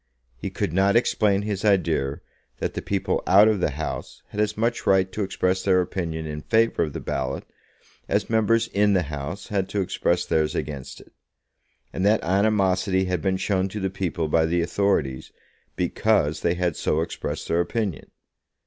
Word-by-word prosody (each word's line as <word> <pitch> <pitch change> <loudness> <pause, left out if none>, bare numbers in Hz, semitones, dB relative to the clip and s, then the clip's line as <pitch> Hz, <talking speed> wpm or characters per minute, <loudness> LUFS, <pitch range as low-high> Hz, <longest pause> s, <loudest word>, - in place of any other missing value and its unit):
He 65 - -5
could - - -3
not 95 +3 +3
explain 105 -4 +2
his 105 -1 -3
idea 85 -9 +1 0.4
that - - -3
the - - -4
people 100 -1 -1
out 100 +4 +7
of 110 -2 +2
the 90 - +1
House 75 +2 -6
had 105 - -6
as 105 0 -1
much 115 +2 -1
right 95 -1 +3
to 105 - -4
express 95 -1 0
their 95 -1 +3
opinion 85 -3 -3
in 75 -1 -5
favour 115 +4 +2
of 75 -4 -1
the - - -4
ballot - - -3 0.7
as 100 +1 +1
members 115 +1 +2
in 105 0 +2
the 90 -2 +2
House 75 +6 -6
had 95 -2 -1
to 100 - -1
express 95 - 0
theirs 75 -1 +1
against 70 -3 -5
it; - - -20 0.8
and 95 - -2
that 105 +2 +3
animosity 95 0 +2
had 90 -3 -1
been 95 +3 0
shown 95 -1 0
to 105 - -5
the 95 -1 -2
people 90 -4 -2
by 80 +1 +2
the 85 +1 +1
authorities 85 -8 0 0.4
because 75 +2 +1
they 85 0 +1
had 90 -2 0
so 80 - 0
expressed 85 - -4
their 85 +1 +2
opinion. 100 0 -3
95 Hz, 180 wpm, -24 LUFS, 80-100 Hz, 0.8 s, out